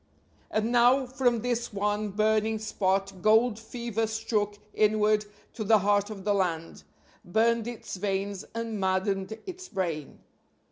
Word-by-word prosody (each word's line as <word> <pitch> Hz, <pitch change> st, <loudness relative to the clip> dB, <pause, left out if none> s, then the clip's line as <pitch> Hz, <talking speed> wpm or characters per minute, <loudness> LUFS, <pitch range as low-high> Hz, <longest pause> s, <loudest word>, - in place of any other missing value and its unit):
And 220 Hz, +2 st, 0 dB
now 245 Hz, +2 st, +5 dB
from 245 Hz, -2 st, +1 dB
this 240 Hz, 0 st, -1 dB
one 205 Hz, +1 st, -1 dB
burning 215 Hz, +2 st, +1 dB
spot 195 Hz, -3 st, -1 dB
gold 220 Hz, +2 st, +4 dB
fever 225 Hz, -1 st, -3 dB
struck 215 Hz, -2 st, -1 dB, 0.2 s
inward 215 Hz, 0 st, +3 dB, 0.3 s
to 220 Hz, -, -4 dB
the 220 Hz, +1 st, +5 dB
heart 205 Hz, +1 st, +2 dB
of 200 Hz, -3 st, -7 dB
the 205 Hz, +1 st, +2 dB
land; 170 Hz, -4 st, -1 dB, 0.4 s
burned 225 Hz, +4 st, +2 dB
its 235 Hz, -4 st, -6 dB
veins 195 Hz, 0 st, -2 dB
and 230 Hz, -2 st, -3 dB
maddened 190 Hz, +2 st, 0 dB
its 370 Hz, 0 st, -8 dB
brain. 165 Hz, -7 st, -3 dB
215 Hz, 135 wpm, -28 LUFS, 195-230 Hz, 0.4 s, now